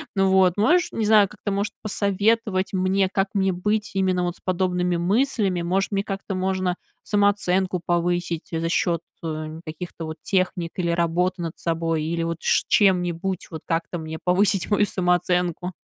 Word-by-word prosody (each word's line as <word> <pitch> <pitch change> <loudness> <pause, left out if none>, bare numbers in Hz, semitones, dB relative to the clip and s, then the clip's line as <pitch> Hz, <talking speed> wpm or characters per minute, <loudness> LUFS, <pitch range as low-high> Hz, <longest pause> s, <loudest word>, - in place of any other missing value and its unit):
Ну 195 0 +3
вот, 190 -2 +4
можешь, 350 - +3
не 220 - -1
знаю, 210 -1 +6
как-то, 205 -1 -5
может, 200 +2 -1
посоветовать 205 -1 +1
мне, 190 +1 +1
как 195 0 0
мне 195 -2 +2
быть 210 +3 -1
именно 185 -1 +1
вот 175 0 -2
с - - -26
подобными 180 -1 0
мыслями. 195 0 +1
Может, 190 +4 0
мне 200 0 0
как-то 195 -1 -4
можно 185 -1 0 0.3
самооценку 190 -3 +1
повысить 175 -1 -1
за 165 0 -1
счет, 170 -1 +1 0.2
э, 155 0 -5
каких-то 165 +1 -7
вот 160 0 -6
техник, 185 -3 -1
или 170 -2 0
работы 175 +2 0
над 165 -1 -5
собой, 165 -1 -1
или 165 +2 -2
вот 165 0 -2
ш - - +2
чем-нибудь, 180 -2 +1
вот 160 - -6
как-то 165 +1 -2
мне 160 -1 -6
повысить 190 0 +2
мою 205 0 +4
самооценку? 180 -1 0
185 Hz, 165 wpm, -23 LUFS, 170-195 Hz, 0.3 s, знаю